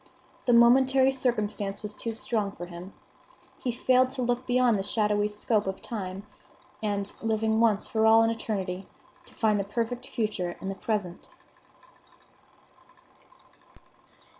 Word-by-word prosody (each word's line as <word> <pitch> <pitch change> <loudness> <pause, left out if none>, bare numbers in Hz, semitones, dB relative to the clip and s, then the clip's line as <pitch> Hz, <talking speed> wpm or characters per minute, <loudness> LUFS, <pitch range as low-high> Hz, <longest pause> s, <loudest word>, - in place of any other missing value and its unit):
The 245 - +3
momentary 260 +3 +5
circumstance 215 -6 -2
was 210 0 -5
too 225 +1 -5
strong 215 -3 -2
for 175 - -7
him; 175 +2 -10 0.7
he 250 - 0
failed 255 +1 +3
to 260 -1 -4
look 245 +1 -1
beyond 245 -4 +3
the - - 0
shadowy 210 0 +1
scope 210 0 0
of 190 - -3
time, 195 -3 -6 0.6
and, 205 -2 -2
living 220 0 +1
once 220 -3 +3
for 220 0 +1
all 225 +1 +7
in 225 - +2
eternity, 195 -4 -4 0.4
to - - -16
find 215 -2 +2
the - - 0
perfect 235 +5 -3
future 210 -6 -3
in 190 - -5
the - - -2
present. 195 -3 -4
220 Hz, 140 wpm, -27 LUFS, 200-240 Hz, 0.7 s, all